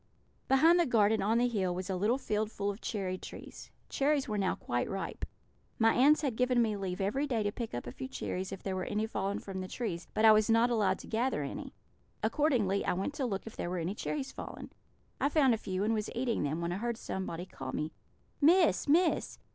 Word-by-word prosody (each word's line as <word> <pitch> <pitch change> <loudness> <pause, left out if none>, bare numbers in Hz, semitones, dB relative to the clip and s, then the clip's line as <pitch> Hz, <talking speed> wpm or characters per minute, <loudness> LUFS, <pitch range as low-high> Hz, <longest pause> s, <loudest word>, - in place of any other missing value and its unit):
"Behind 320 +6 +5
the 340 - +3
garden, 220 -2 +3
on 215 +4 +2
the 245 +1 +3
hill, 190 -7 -1
was 185 0 -4
a 190 - -1
little 210 +7 +2
field 215 -4 -1
full 200 -2 -2
of 200 - -10
cherry 185 -4 -3
trees. - - -10 0.2
Cherries 285 0 +1
were 210 -2 -1
now 190 -2 +1
quite 120 0 -2
ripe. 195 0 -4 0.5
My 225 0 +4
aunts 295 +5 +5
had 270 -7 -1
given 250 +1 +2
me 220 -3 +2
leave 190 -2 -4
every 240 +10 0
day 235 -6 0
to 205 - 0
pick 230 - -5
up 120 - -4
a 120 - -6
few 130 - -6
cherries 180 +8 -4
if 195 - -7
there 190 -1 -2
were 185 - -2
any 215 +1 -1
fallen 200 -2 -2
from 190 -1 -6
the 185 - -5
trees, 180 -6 -4
but 220 - +3
I 220 - +10
was 215 0 +4
not 230 +2 +4
allowed 205 -5 +2
to - - -12
gather 230 - 0
any. 140 - -6 0.5
Accordingly 245 - +2
I - - +1
went 190 +10 -2
to 275 -3 -1
look 195 -4 -3
if 225 - -9
there 175 - -3
were 180 - -2
any 170 +3 -2
cherries 270 +5 -3
fallen. - - -8 0.5
I 280 - +2
found 280 -5 +4
a - - +1
few, 190 -2 -3
and 220 +2 +2
was 215 -1 -1
eating 240 -1 0
them, 150 +3 -1
when 170 0 -2
I 175 - -2
heard 235 +2 -2
somebody 185 -6 -4
call 130 -7 -7
me, 155 +3 -3 0.5
'Miss! 335 +3 +4
Miss!' 330 +4 +2
215 Hz, 235 wpm, -31 LUFS, 190-250 Hz, 0.5 s, I